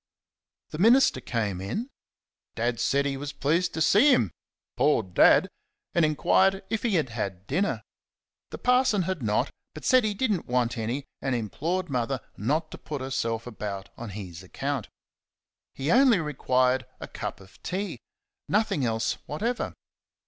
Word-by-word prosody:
The 155 - -6
minister 230 - +5
came 105 -7 -2
in. 215 - -4 0.6
Dad 120 0 -1
said 140 +1 +2
he 135 -1 -1
was 145 +1 -5
pleased 170 +5 0
to 160 - +2
see 245 - +6
him 110 - +3 0.4
poor 140 -2 +3
Dad! 90 -2 +5 0.5
and 170 - +3
enquired 190 +5 +3
if 225 - 0
he 225 -5 +1
had 155 -6 +1
had 100 -5 -4
dinner. 180 - -1 0.7
The - - -7
parson 250 -5 +3
had 185 -3 -3
not, 105 -2 0 0.2
but - - -8
said 255 -1 +5
he 210 -1 0
did 235 +2 +1
n't 190 - -1
want 125 -1 +1
any, 120 +5 -3 0.2
and 135 -2 0
implored 165 - -2
Mother 130 -1 -1 0.2
not 155 - -1
to - - -9
put 150 -2 -5
herself 115 -4 -2
about 100 -4 -6
on 120 -2 -7
his 90 -4 -8
account. 135 +6 -4 0.9
He 140 +4 -1
only 255 -3 +6
required 130 -4 +1
a - - -7
cup - - -6
of 95 0 -18
tea 195 +2 -3 0.5
nothing 210 -9 +1
else 115 -2 0
whatever. 230 +11 -2
140 Hz, 155 wpm, -27 LUFS, 115-185 Hz, 0.9 s, see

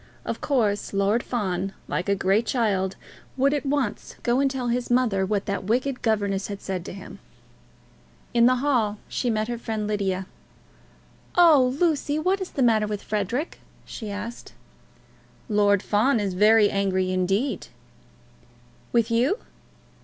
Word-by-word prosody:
Of - - -4
course 215 -9 0
Lord 200 +4 +2
Fawn, 195 -6 -2
like 180 +2 -2
a 200 - +3
great 195 +4 +1
child, 195 -6 0 0.4
would 275 +2 +3
at 290 -1 -2
once 270 -6 -2
go 240 +2 +2
and 275 0 +3
tell 255 -2 -3
his 245 +1 -1
mother 230 -6 +2
what 200 0 -1
that 200 -1 -3
wicked 250 +5 0
governess 200 -3 0
had 200 -1 -6
said 185 -3 -4
to - - -7
him. 195 0 -10 1.1
In 235 0 +5
the 255 - +4
hall 225 -7 +1
she 245 - -2
met 215 -1 0
her 240 -1 -4
friend 220 -2 -3
Lydia. 195 -3 -1 1.1
"Oh, 290 -7 +6
Lucy, 305 -3 +1
what 370 +5 0
is 375 - -4
the 270 - -1
matter 220 -3 +3
with 210 -1 -4
Frederic?" 215 - -2 0.3
she 220 -3 -7
asked. 210 +4 -7 0.9
"Lord 205 -3 +3
Fawn 230 +4 +2
is 200 -3 -1
very 210 +2 +5
angry 190 -2 0
indeed." 195 +8 0 1.2
"With 230 -1 +2
you?" 250 - +2
215 Hz, 150 wpm, -25 LUFS, 200-255 Hz, 1.2 s, Oh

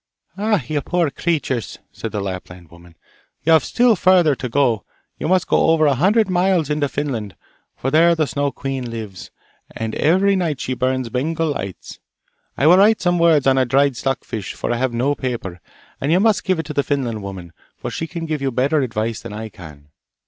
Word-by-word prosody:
'Ah, 210 -5 0
you 150 0 -1
poor 170 -1 0
creatures!' 145 -9 -2
said 115 - -6
the 105 - -3
Lapland 90 -3 -7
woman; 85 0 -17 0.5
'you 165 - +5
have 160 - +5
still 240 -2 +3
further 180 -5 +4
to 125 -1 -5
go! 120 -4 +1 0.4
You - - -2
must 185 +1 +2
go - - +2
over 160 -1 +4
a 145 - +4
hundred 200 - +3
miles 180 -4 +1
into 150 -1 0
Finland, 120 - -4 0.4
for 135 - -3
there 170 +3 +5
the 160 -1 +1
Snow 145 0 -1
queen 135 -3 -4
lives, 110 -5 -7 0.4
and 110 -1 -5
every 190 +6 +3
night 165 -7 -1
she 130 - -2
burns 130 -1 -1
Bengal 155 +6 -1
lights. 100 -9 -7 0.6
I 140 - +1
will 175 +4 +7
write 215 +3 +5
some 175 -1 +1
words 165 -4 +4
on 135 -1 +4
a - - +4
dried 135 +2 +2
stock 135 +2 -2
fish, 105 -5 -6
for - - -3
I 120 - 0
have 130 +1 0
no 125 +5 0
paper, 115 -11 -5 0.4
and 140 - 0
you 175 - +4
must 210 -2 +2
give 185 -3 +1
it 160 - -3
to 150 - -6
the 145 - +2
Finland 130 -7 -2
woman, 95 -4 -8 0.2
for - - -5
she 165 - -4
can 165 0 -5
give 155 -3 -3
you 135 - 0
better 140 +5 +1
advice 115 -3 -2
than - - -8
I 110 +1 -6
can. 75 -6 -13
140 Hz, 205 wpm, -20 LUFS, 115-165 Hz, 0.6 s, will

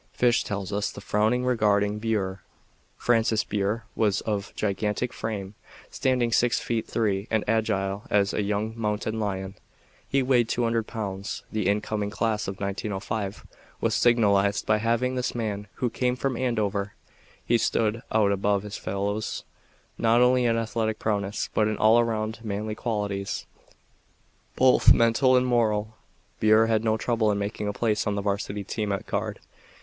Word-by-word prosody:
Fish 120 -1 +3
tells 100 -2 -4
us 105 +1 0
the - - -9
following 110 +4 +1
regarding 105 -4 +2
Burr: 100 -4 -1 0.6
"Francis 115 -2 +2
Burr 105 +2 -1
was 105 -3 +1
of 100 -2 -3
gigantic 105 +3 -1
frame, 100 -3 -4 0.4
standing 125 -3 +1
six 120 +1 +3
feet 115 -2 -2
three 100 -2 0
and 110 -2 +1
agile 105 -2 0
as 100 -1 +2
a - - 0
young 105 +2 -1
mountain 110 0 -2
lion. 95 -2 -3 0.6
He 135 -1 +2
weighed 125 -3 +3
200 115 -2 0
pounds. 100 -3 -5
The 105 -3 -1
incoming 105 0 0
class 110 0 -1
of 95 0 -5
1905 100 +1 -3 0.3
was - - 0
signalized 100 -4 +3
by 110 0 +2
having 115 +3 +1
this 125 -1 -2
man 105 -3 -3
who 125 - -1
came 125 +1 0
from 130 0 -1
Andover. 105 -5 -1 0.5
He 120 0 +3
stood 110 0 0
out 105 -2 +3
above 100 0 +1
his 105 0 -6
fellows, 100 +2 -3 0.6
not 115 +1 +4
only 125 0 +4
in 115 -1 +2
athletic 110 -1 -1
prowess 100 -1 -1
but 105 - +2
in 110 - -1
all 110 +2 +5
around 110 -1 -1
manly 105 0 -3
qualities, 105 -3 -3 1.1
both 130 0 +6
mental 115 +3 +4
and 125 - +2
moral. 110 -3 +1 0.4
Burr 110 +1 +5
had 110 -1 +1
no 110 -1 +2
trouble 115 -1 +1
in 100 - 0
making 105 +1 -3
a - - 0
place 105 0 0
on 105 - 0
the 100 - -2
Varsity 100 0 -2
team 105 +1 -3
at 100 +2 -2
Guard. 105 0 -3
110 Hz, 155 wpm, -26 LUFS, 100-115 Hz, 1.1 s, both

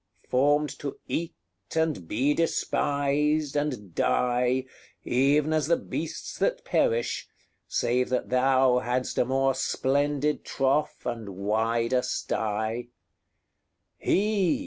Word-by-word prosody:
formed 145 +3 +2
to 140 -2 -5
eat, 165 0 -3 0.4
and 160 - 0
be 130 - +1
despised, 145 -1 0
and 130 - -2
die, 125 +4 +1 0.4
Even 145 +5 +2
as 155 -2 +1
the 170 - +3
beasts - - -5
that - - 0
perish, 475 -1 0 0.4
save 125 +1 0
that 130 - -1
thou 130 0 +4
Hadst 125 +1 -1
a - - +3
more 135 +1 +2
splendid 145 +3 0
trough, 135 +3 0
and 115 -4 -4
wider 115 +4 +1
sty: 110 +1 -2 1.1
HE! 210 +4 +2
135 Hz, 105 wpm, -27 LUFS, 125-150 Hz, 1.1 s, thou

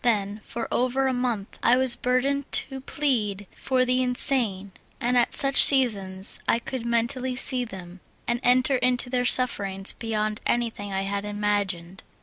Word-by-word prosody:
Then, 210 -3 -1
for 235 - -6
over 255 +2 -1
a 260 - 0
month, 240 -5 -4
I 245 +2 +3
was 260 -2 +2
burdened 270 +3 -2
to 265 -1 -2
plead 225 -9 -2
for 255 -1 -1
the 255 +1 0
in 250 -1 -2
sane, 210 -9 +5 0.3
and 245 +1 -1
at 240 -1 +2
such 275 0 +6
seasons 200 -8 +2
I - - +2
could 240 0 -6
mentally 245 +2 -2
see 250 0 +4
them, 185 -4 -11 0.3
and 240 0 -1
enter 255 +2 +2
into 250 0 -1
their 250 -1 -1
sufferings 200 -7 +1
beyond 215 -2 -4
anything 225 -4 -3
I 195 0 -3
had 200 +1 -4
imagined. 205 -4 -3
240 Hz, 160 wpm, -24 LUFS, 205-255 Hz, 0.3 s, such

